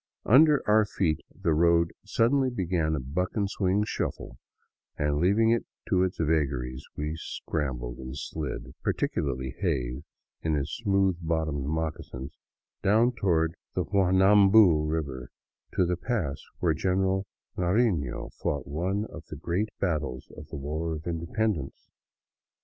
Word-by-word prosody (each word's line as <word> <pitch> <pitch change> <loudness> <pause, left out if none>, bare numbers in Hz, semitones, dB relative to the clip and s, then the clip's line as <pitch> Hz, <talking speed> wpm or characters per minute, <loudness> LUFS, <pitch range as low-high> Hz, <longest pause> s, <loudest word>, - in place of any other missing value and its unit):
Under 150 +5 +6
our 110 +1 +5
feet 85 -6 0
the 80 - 0
road 85 +1 +3
suddenly 130 +3 +2
began 85 -8 0
a - - -1
buck 80 +9 -2
and 100 -3 +1
wing 100 +1 +2
shuffle, - - -4 0.6
and 75 0 +1
leaving 105 +7 +4
it 115 - +2 0.3
to 95 -5 +3
its 95 -1 0
vagaries 70 -6 0
we 75 +1 -2
scrambled 60 -7 -4
and 65 +1 -7
slid 80 -2 -5
— - - -43
particularly 65 -2 -1
Hays 65 -8 -1 0.4
in 80 -1 0
his 70 0 -2
smooth 95 -5 +1
bottomed 80 -4 -1
moccasins 75 -4 -4 0.3
— - - -66
down 110 +5 +4
toward 85 -8 +1 0.2
the - - +1
Juanambu 95 -3 +5
river, 70 -5 -3 0.5
to 90 - +3
the 90 0 0
pass 85 - -2 0.2
where 85 -3 +2
General 95 +3 0 0.3
Narifio 90 - 0
fought 70 -2 -2
one 90 +9 -1
of 85 -6 -11
the - - -7
great 90 +8 -1
battles 75 -8 -2
of 75 - -10
the 80 - -7
war 80 +4 -3
of 75 - -8
independence. 85 - -2
85 Hz, 140 wpm, -28 LUFS, 75-95 Hz, 0.6 s, Under